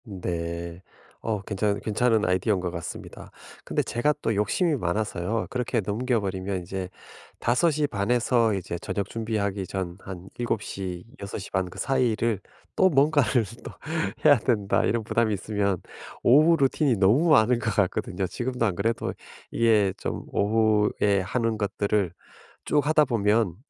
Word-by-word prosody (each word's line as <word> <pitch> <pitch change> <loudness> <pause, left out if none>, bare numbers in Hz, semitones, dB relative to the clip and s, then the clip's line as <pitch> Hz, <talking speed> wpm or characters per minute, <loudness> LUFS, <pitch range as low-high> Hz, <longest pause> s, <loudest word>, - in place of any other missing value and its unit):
네. 85 -3 -5 0.4
어 110 -2 -1
괜찮은 100 0 -1
괜찮은 110 0 +2
아이디어인 95 +2 +1
것 90 -1 -3
같습니다. 85 -1 -8 0.3
근데 - - -1
제가 120 +5 +1
또 115 - +1
욕심이 145 - +1
많아서요. 105 0 -1
그렇게 125 -1 -1
넘겨 115 +4 0
버리면 95 -1 -3
인제 95 +1 -5 0.5
5:30 140 -6 +1
에서 120 -2 +3
이제 90 -2 -4
저녁 100 -1 -3
준비하기 105 -4 -2
전 90 -2 -4
한 95 -1 -9
'7:00 95 -6 -3 0.2
6:30 95 -1 -3
사이를 115 -5 +1 0.4
또 190 - +5
뭔가를 140 -5 +3 0.2
또 - - -7 0.5
해야 145 -4 +7
된다.' 105 -5 +1
이런 115 +1 0
부담이 110 0 +1
있으면 100 -1 -1 0.5
오후 155 +7 +6
루틴이 135 -1 +2
너무 115 - +4
많은 125 -4 +5
것 115 - -1
같거든요. 95 -1 0
지금도 125 +4 -2
안 100 - +1
그래도 115 +5 -1 0.4
이게 110 -4 +3
좀 - - -4
오후에 105 -1 +2
하는 115 +3 -1
것들을 100 -2 0 0.5
쭉 145 -2 +2
하다 155 0 +4
보면 105 - +1
110 Hz, 275 characters per minute, -26 LUFS, 95-120 Hz, 0.5 s, 해야